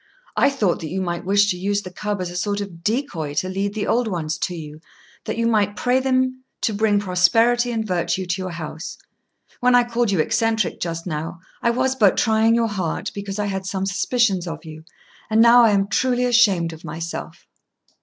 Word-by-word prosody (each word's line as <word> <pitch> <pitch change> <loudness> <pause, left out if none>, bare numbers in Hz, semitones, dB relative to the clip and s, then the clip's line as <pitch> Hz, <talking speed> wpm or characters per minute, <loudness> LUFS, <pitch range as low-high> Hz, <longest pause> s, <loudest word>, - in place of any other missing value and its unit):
I 275 - +4
thought 215 -11 0
that 160 - -6
you 190 - -3
might 175 -1 -3
wish 205 +2 +3
to 180 - -3
use 200 +2 -1
the 185 - -8
cub 205 +1 -3
as 180 -1 -4
a - - -9
sort 200 +3 -1
of 180 -5 -7
decoy 190 - -2
to 170 +5 0
lead 195 +2 -2
the 215 - -2
old 240 0 +1
ones 160 -5 -3
to 180 - -2
you, 155 -1 -9 0.4
that - - -3
you 230 - 0
might 210 -3 +2
pray 250 +4 +1
them 255 -1 0 0.2
to 220 - 0
bring 205 0 +2
prosperity 225 +6 +3
and 225 -2 -2
virtue 185 0 -1
to 180 +2 -2
your 185 - -4
house. 170 +2 -7 0.6
When 250 0 +4
I 245 - +6
called 240 -1 0
you 195 - +1
eccentric 220 +3 0
just 165 -1 -4
now, 165 0 -4 0.2
I - - +2
was 255 +2 +1
but 210 -7 +4
trying 225 0 +3
your 230 -1 +2
heart, 190 -6 -3
because 200 0 -5
I 210 - -1
had 195 -1 -3
some 190 0 -2
suspicions 195 -2 +1
of 165 -1 -7
you; 155 0 -10 0.4
and 220 0 +2
now 235 +1 +7
I - - +5
am 200 -1 +2
truly 250 +3 +1
ashamed 200 -9 +3
of 160 - -12
myself." 165 +1 -6
200 Hz, 210 wpm, -22 LUFS, 175-230 Hz, 0.6 s, now